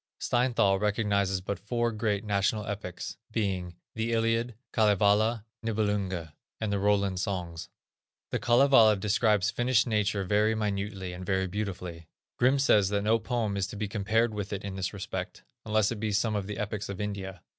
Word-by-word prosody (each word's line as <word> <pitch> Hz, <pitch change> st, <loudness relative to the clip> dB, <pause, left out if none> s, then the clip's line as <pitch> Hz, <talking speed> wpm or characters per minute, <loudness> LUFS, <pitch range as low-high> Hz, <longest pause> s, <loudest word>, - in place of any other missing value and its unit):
Steinthal 120 Hz, -6 st, +2 dB
recognizes 100 Hz, -3 st, +1 dB
but 100 Hz, +2 st, -4 dB
four 120 Hz, +3 st, -1 dB
great 105 Hz, -2 st, -1 dB
national 105 Hz, 0 st, 0 dB
epics, 100 Hz, -3 st, -5 dB
viz., 95 Hz, -5 st, -1 dB, 0.2 s
the 115 Hz, +1 st, -1 dB
Iliad, 115 Hz, +1 st, +1 dB, 0.2 s
Kalevala, 105 Hz, +1 st, +3 dB, 0.2 s
Nibelunge 100 Hz, -7 st, -1 dB, 0.3 s
and 110 Hz, -2 st, -1 dB
the 100 Hz, -, 0 dB
Roland 100 Hz, -2 st, +1 dB
Songs. 90 Hz, -4 st, -4 dB, 0.6 s
The -, -, 0 dB
Kalevala 120 Hz, -3 st, +6 dB
describes 105 Hz, 0 st, +2 dB
Finnish 120 Hz, -1 st, +2 dB
nature 105 Hz, -3 st, 0 dB
very 105 Hz, +3 st, +2 dB
minutely 100 Hz, -3 st, -3 dB
and 90 Hz, +1 st, -7 dB
very 95 Hz, 0 st, 0 dB
beautifully. 90 Hz, -4 st, -5 dB, 0.3 s
Grimm 130 Hz, +3 st, +4 dB
says 105 Hz, -8 st, +4 dB
that 100 Hz, 0 st, 0 dB
no 110 Hz, +2 st, +3 dB
poem 115 Hz, -2 st, -1 dB
is 100 Hz, -1 st, -1 dB
to 95 Hz, -, -8 dB
be 105 Hz, 0 st, -2 dB
compared 110 Hz, +3 st, +1 dB
with 105 Hz, -1 st, -4 dB
it 100 Hz, -1 st, -4 dB
in 100 Hz, -1 st, -5 dB
this 95 Hz, -1 st, -2 dB
respect, 100 Hz, -2 st, -6 dB, 0.2 s
unless 110 Hz, 0 st, +2 dB
it 115 Hz, -, -4 dB
be 110 Hz, 0 st, -1 dB
some 105 Hz, +2 st, +1 dB
of 100 Hz, -2 st, -2 dB
the 105 Hz, -, -5 dB
epics 105 Hz, 0 st, -3 dB
of 100 Hz, -, -5 dB
India. 95 Hz, -3 st, -5 dB
105 Hz, 165 wpm, -29 LUFS, 95-110 Hz, 0.6 s, Kalevala